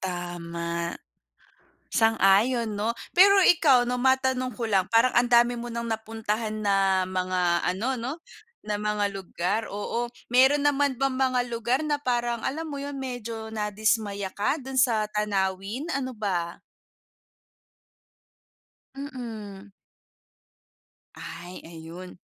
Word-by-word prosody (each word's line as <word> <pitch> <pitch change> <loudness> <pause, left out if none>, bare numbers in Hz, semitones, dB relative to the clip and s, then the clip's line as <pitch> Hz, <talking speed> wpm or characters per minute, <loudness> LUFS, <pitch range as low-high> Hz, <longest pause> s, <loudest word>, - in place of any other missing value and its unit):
Tama. 170 -2 -4 1.0
Sang-ayon 225 0 +3
'no. 220 +2 +1 0.2
Pero 395 +2 +7
ikaw 280 -9 +5
'no, 250 - 0
matanong 260 0 +2
ko 235 - -5
lang, 190 -3 +2
parang 230 +3 +5
ang 240 +1 +4
dami 240 0 +4
mo 240 - -5
ng 235 0 -4
napuntahan 220 -1 -3
na 195 -2 +3
mga 180 -2 0
ano 250 +7 -1
'no, 245 +4 -3 0.5
na 210 0 -2
mga 210 -1 0
lugar, 190 +2 -2
oo. 230 +4 -2 0.2
Meron 265 +3 +5
naman 285 -2 +2
bang 270 -1 +1
mga 255 -1 +2
lugar 235 +3 0
na 295 -1 0
parang 240 -2 -1
alam 320 +4 -2
mo 285 -2 -5
yun, 285 0 -5
medyo 235 -4 -5
nadismaya 210 -2 -1
ka 210 +9 0
do'n 265 0 -2
sa 220 -4 +3
tanawin, 200 - -1
ano 260 -1 -2
ba? 175 -5 -2 2.3
Mm. 220 -8 -8 1.4
Ay, 175 +2 -9
ayun. 170 +3 -10
225 Hz, 120 wpm, -26 LUFS, 195-255 Hz, 2.3 s, Pero